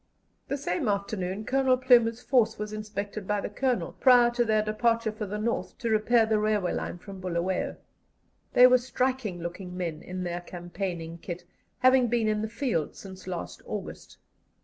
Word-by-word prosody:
The 280 - -2
same 285 0 -2
afternoon 200 0 -2
Colonel 265 0 +3
Plumer's 245 -2 +4
force 245 -4 +2
was 210 0 -5
inspected 210 -1 -5
by 210 0 +1
the 200 - -4
Colonel, 255 +2 0
prior 245 -2 +6
to 240 0 +1
their 215 -2 +2
departure 230 +1 +1
for 215 -1 -5
the 210 +2 -4
North 230 +2 -2
to 230 -1 -2
repair 220 +2 +4
the 220 -1 +1
railway 210 -3 +1
line - - -3
from 195 +2 -10
Bulawayo. 180 +1 -1 0.8
They 250 - +8
were 255 0 +7
striking 250 -6 -2
looking 180 +1 -6
men 165 -4 -3
in 185 0 -5
their 175 0 -3
campaigning 175 -1 -5
kit, 175 -2 -6 0.3
having 255 -1 +5
been 230 -1 +1
in 215 0 +1
the 220 - -3
field 230 - -2
since 190 -1 -11
last 180 -2 -5
August. - - -7
215 Hz, 170 wpm, -28 LUFS, 185-240 Hz, 0.8 s, They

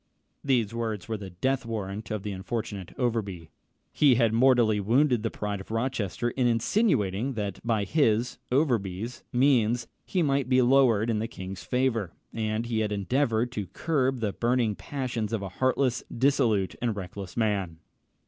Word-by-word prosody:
These 120 -6 +1
words 110 -5 -3
were 110 - -2
the 100 -2 -8
death 130 +9 -1
warrant 105 -2 -5
of 105 -2 -3
the 105 - -3
unfortunate 100 -1 -4
Overbury. 100 -10 -2 0.4
He 140 -4 +5
had 115 -2 +3
mortally 120 -3 +4
wounded 120 +4 +3
the 115 - -1
pride 105 -2 -4
of - - -13
Rochester 115 -1 -1
in 125 0 +1
insinuating 120 - +1
that 100 -5 -3
by 115 -3 +1
his 120 -1 +1
(Overbury's) 120 - 0
means 120 -3 +3 0.2
he 180 -3 0
might 140 -3 +1
be 130 -1 +5
lowered 120 -4 +4
in 110 - 0
the 110 - -2
king's 95 -5 -8
favour; 115 -8 0 0.2
and 110 0 -1
he 115 -2 -1
had 105 -1 0
endeavoured 115 +3 0
to 105 -6 -4
curb 135 - 0
the 105 -3 -1
burning 120 -2 +1
passions 125 -3 -4
of 110 -3 -1
a 95 - -4
heartless, 130 +3 0
dissolute, 120 -7 +2
and 115 -3 0
reckless 95 0 -7
man. 100 -7 0
115 Hz, 160 wpm, -27 LUFS, 105-125 Hz, 0.4 s, He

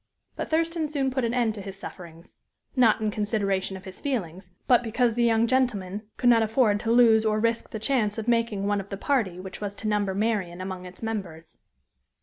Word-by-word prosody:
But - - -4
Thurston 325 0 0
soon 280 -3 -1
put 260 0 -1
an 235 0 0
end 235 -3 +1
to 210 - -8
his 195 -1 -8
sufferings 170 -4 -11 0.4
not 235 -4 +4
in 215 -1 0
consideration 200 -3 -1
of 190 - -13
his 190 - -9
feelings, 190 - -3 0.2
but 245 -2 +5
because 235 +1 +1
the 240 +1 +1
young 230 -1 +3
gentleman 215 -5 -1
could 245 -1 +4
not 230 -1 +5
afford 220 -1 +2
to 225 +1 -1
lose 230 -2 +6
or 215 -1 +1
risk 230 +1 0
the - - -5
chance 220 -2 0
of 220 0 -4
making 230 -4 +1
one 205 0 +1
of 195 - -14
the 195 - -5
party 205 -8 0
which 185 +1 -8
was 205 -1 -4
to 215 - -5
number 205 -2 0
Marian 200 -5 -1
among 185 -1 -6
its 180 +5 -11
members. 190 -8 -5
215 Hz, 210 wpm, -26 LUFS, 195-235 Hz, 0.4 s, lose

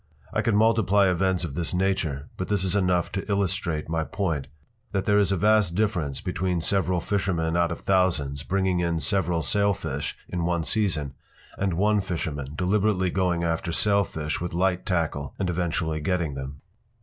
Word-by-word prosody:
I - - +1
could 115 - +1
multiply 105 -2 +4
events 90 0 +1
of 75 -5 -4
this 85 +3 -2
nature, 90 -7 0
but 95 - -4
this 100 -3 0
is 95 0 0
enough 90 -3 +1
to 100 +1 -3
illustrate 95 -5 -1
my 80 0 0
point—that 85 - -4
there 105 -1 +4
is 100 -2 +2
a 95 - +2
vast 105 -2 +3
difference 85 -10 0
between 90 -1 -1
several 95 +1 +1
fishermen 85 -4 -1
out 85 0 +2
of 85 - -5
thousands 80 -8 +1
bringing 95 +1 0
in 85 -1 0
several 85 +1 0
sailfish 100 +5 0
in 90 -1 -3
one 85 -1 0
season 80 -6 0 0.4
and 95 -3 -1
one 105 +3 +3
fisherman 80 -6 -4
deliberately 95 0 +1
going 90 -2 +1
after 85 +1 -1
sailfish 85 -5 0
with 85 -1 -3
light 90 0 +1
tackle 80 -6 -1
and 95 -3 -1
eventually 80 -2 -1
getting 85 -2 0
them. 70 +1 -7
90 Hz, 165 wpm, -26 LUFS, 80-100 Hz, 0.4 s, multiply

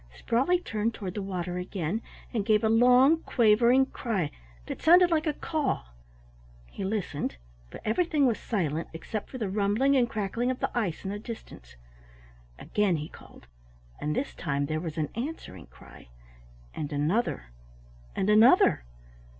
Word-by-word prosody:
Sprawley 265 - +2
turned 225 -9 -2
toward 190 -4 -5
the 205 - -4
water 180 -2 -4
again 180 +2 -3 0.3
and 220 -4 0
gave 215 0 +2
a 220 - +3
long, 250 +7 +5
quavering 235 +3 +4
cry 205 - -3 0.3
that - - -6
sounded 350 +2 +6
like 315 0 +1
a 305 - +1
call. 290 - -2 0.8
He - - -6
listened, 190 - -3 0.3
but - - -10
everything 300 +5 +2
was 235 -4 +1
silent 165 -7 -2
except 205 +6 -6
for 260 - -7
the 220 -5 -2
rumbling 210 +8 +2
and 245 -3 +3
cracking 220 +4 -2
of 255 - -2
the - - -3
ice 205 -9 -1
in 195 - -3
the 205 - -4
distance. 205 - -10 0.8
Again 205 -4 0
he 150 +1 -6
called, - - -15 0.5
and 150 +1 -2
this 275 - -2
time 140 -3 -2
there 155 +2 -2
was 165 -2 -6
an 155 -2 -1
answering 230 - -6
cry, - - -16 0.7
and 150 0 -5
another, 145 - -1 0.6
and 190 - 0
another. 210 - +5
215 Hz, 155 wpm, -28 LUFS, 175-245 Hz, 0.8 s, sounded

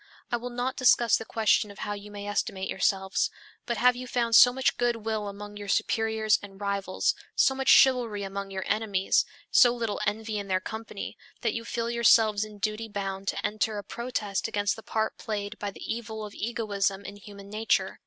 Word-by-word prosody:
I 240 - +2
will 245 +1 -6
not 245 +2 -2
discuss 240 -2 +5
the 225 - -7
question 220 -1 +2
of 200 - -12
how 205 - -2
you 205 0 -8
may 205 0 -7
estimate 195 -2 -2
yourselves, 190 -3 +1 0.4
but 235 - -1
have 250 +2 +4
you 250 +1 -7
found 235 -2 0
so 245 - +9
much 265 +1 0
good 240 -3 0
will 215 -2 -1
among 205 +1 -8
your 205 0 -7
superiors 220 +1 +1
and 195 -1 -11
rivals, 200 -2 0 0.2
so 265 - +4
much 265 0 -4
chivalry 240 -6 +5
among 195 0 -5
your 190 -1 -4
enemies, 205 -3 +1 0.3
so 245 - +7
little 230 -3 -2
envy 215 +1 -2
in 200 - -6
their 185 -1 +1
company, 220 +4 -7 0.2
that - - 0
you 230 - -4
feel 235 0 -2
yourselves 220 -3 +4
in 215 -1 -9
duty 215 +2 -2
bound 195 -2 -4
to - - -2
enter 215 0 -1
a 205 - -5
protest 215 -3 -3
against 205 -2 0
the 225 - -10
part 220 0 -2
played 210 0 -4
by 205 - -3
the 195 - -11
evil 220 -1 -4
of 205 - -9
egoism 200 -3 -2
in - - -7
human 200 0 -12
nature? 220 +1 0
215 Hz, 200 wpm, -27 LUFS, 200-230 Hz, 0.4 s, so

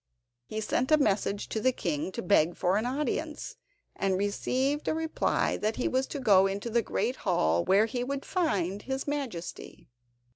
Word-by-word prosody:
He 220 0 -4
sent 250 +5 0
a 310 - +7
message 205 -5 0
to 220 - -2
the 255 +4 +3
king 170 - -2
to - - -4
beg 175 -3 +3
for 180 +3 +2
an 220 +3 0
audience, 300 +3 -3 0.4
and 190 -1 0
received 260 +8 -1
a - - +1
reply 320 0 0
that 215 +1 -1
he 250 - -1
was 260 +1 0
to 290 - -5
go 195 -6 +5
into 200 +4 -4
the 235 +1 +3
great 230 +3 -1
hall, 85 - +1
where 200 +3 +4
he 245 +2 -3
would 275 +2 -4
find 200 - 0
his 265 +3 -4
Majesty. 255 - -5
220 Hz, 180 wpm, -29 LUFS, 195-270 Hz, 0.4 s, a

